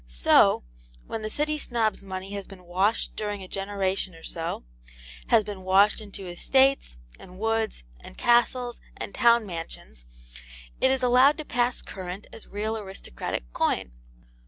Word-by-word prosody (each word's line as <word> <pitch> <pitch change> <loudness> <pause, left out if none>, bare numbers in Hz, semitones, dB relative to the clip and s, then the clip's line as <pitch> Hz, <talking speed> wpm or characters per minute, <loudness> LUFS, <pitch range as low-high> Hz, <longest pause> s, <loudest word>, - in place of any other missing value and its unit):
So, - - +4 0.4
when 225 - -4
the 215 - -3
City 300 +4 -1
Snob's 225 -7 0
money 190 0 -6
has 200 -1 -5
been 190 -2 -13
washed 190 +5 0
during 205 -2 -3
a - - -9
generation 195 -1 -2
or 165 - -15
so; 165 - -4 0.6
has 215 - +5
been 205 -2 -7
washed 195 +3 +4
into 200 -2 -8
estates, 265 - +2 0.2
and 185 0 -13
woods, 225 - -1 0.2
and - - -13
castles, 240 0 +2 0.2
and - - -6
town 235 -3 +4
mansions, 165 - -7 0.7
it 260 - +4
is 265 -1 +2
allowed 255 +4 +5
to 310 - -6
pass 245 -1 0
current 185 +1 -7
as 225 - -11
real 215 +2 -2
aristocratic 190 - -5
coin. 60 - 0
205 Hz, 150 wpm, -26 LUFS, 185-240 Hz, 0.7 s, has